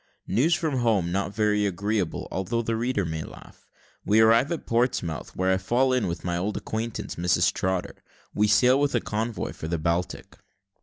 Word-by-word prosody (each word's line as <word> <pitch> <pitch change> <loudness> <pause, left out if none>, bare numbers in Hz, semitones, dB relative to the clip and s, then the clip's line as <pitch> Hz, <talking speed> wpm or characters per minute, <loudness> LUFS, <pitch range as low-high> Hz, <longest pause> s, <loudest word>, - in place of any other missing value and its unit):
NEWS 140 - +2
FROM 155 -5 -1
HOME 105 -8 +1
NOT 100 +1 -2
VERY 105 -1 +2
AGREEABLE, 100 -1 -2
ALTHOUGH 115 +5 -2
THE 115 0 -1
READER 115 -3 -1
MAY 80 -1 -3
LAUGH - - -12 0.5
WE 105 +3 +3
ARRIVE 115 +6 +5
AT 170 - -3
PORTSMOUTH, 115 - -1
WHERE 95 0 +1
I - - +2
FALL 130 +6 +1
IN 125 - +1
WITH 85 - -4
MY 85 -1 -1
OLD 100 +4 -2
ACQUAINTANCE, 110 +1 -4
MRS. 90 +1 +2
TROTTER 95 -1 -2 0.4
WE 105 +1 +2
SAIL 125 +5 +4
WITH 145 -2 +1
A - - +3
CONVOY 110 +1 -3
FOR 80 - -7
THE 85 +1 -1
BALTIC. 85 +2 -2
105 Hz, 185 wpm, -26 LUFS, 90-120 Hz, 0.5 s, ARRIVE